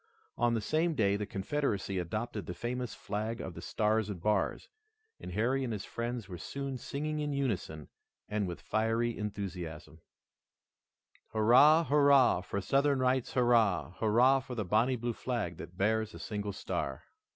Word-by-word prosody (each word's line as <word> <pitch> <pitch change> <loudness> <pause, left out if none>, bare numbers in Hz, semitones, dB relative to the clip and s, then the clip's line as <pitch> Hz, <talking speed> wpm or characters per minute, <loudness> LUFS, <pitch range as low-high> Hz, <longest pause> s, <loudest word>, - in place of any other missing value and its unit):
On 120 -1 +2
the 115 - 0
same 160 +8 +1
day 100 -6 +2
the 105 0 -3
Confederacy 100 -3 -1
adopted 105 +1 -4
the 90 - -5
famous 125 +1 -4
flag 110 +3 -3
of 95 - -5
the 85 - -9
Stars 110 +2 0
and 100 -4 -5
Bars, 105 +2 0 0.5
and 90 - -8
Harry 125 +7 +1
and 125 - -2
his 105 -3 -4
friends 120 -2 -4
were 90 -3 -8
soon 140 +3 -5
singing 150 +4 -3
in 150 -1 -2
unison 100 - -2 0.4
and 105 -2 -1
with 85 - -6
fiery 115 +2 0
enthusiasm: 90 -7 -6 1.3
"Hurrah! 130 +9 +6
Hurrah! 140 - +5
for 100 +1 -3
Southern 140 +6 +2
rights, 130 -1 +1
hurrah! 115 -8 +3
Hurrah 120 +5 +4
for 130 -1 -7
the 110 -3 -2
bonnie 110 +7 +2
blue 120 0 -2
flag 115 -9 -3
that 90 +1 -10
bears 110 +2 0
a - - -9
single 105 -2 -4
star!" 65 -7 -4
110 Hz, 160 wpm, -31 LUFS, 100-130 Hz, 1.3 s, Hurrah